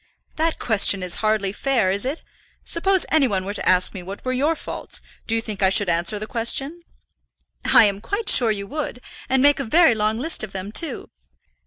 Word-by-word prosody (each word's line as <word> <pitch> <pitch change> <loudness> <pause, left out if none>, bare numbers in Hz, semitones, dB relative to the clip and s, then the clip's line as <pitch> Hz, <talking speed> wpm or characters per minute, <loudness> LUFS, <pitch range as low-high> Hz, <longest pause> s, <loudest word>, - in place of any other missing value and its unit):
"That 320 +1 0
question 200 -4 +2
is 180 -1 +1
hardly 215 -3 0
fair, 235 -6 0
is 200 +4 0
it? 280 +5 -4 0.4
Suppose 380 +2 +2
any 310 -4 +4
one 190 -4 -2
were 200 - -4
to - - -1
ask 185 0 +2
me 190 - -7
what 195 +6 -9
were 255 - -1
your 290 +6 +1
faults, - - -4 0.3
do 225 - 0
you 225 - 0
think 215 -3 -7
I 190 - +5
should 195 0 +2
answer 175 +5 +1
the 210 - -5
question?" 270 +8 -1 0.8
"I - - +6
am 200 -1 -1
quite 405 - -4
sure 240 -3 +4
you 200 -2 -2
would, 290 +1 -5 0.3
and 260 0 +2
make 290 0 +4
a - - -1
very 315 +2 +4
long 215 0 -1
list 315 +3 -3
of 215 - -7
them, 195 +1 -6
too. 325 +8 -4
225 Hz, 210 wpm, -22 LUFS, 200-280 Hz, 0.8 s, I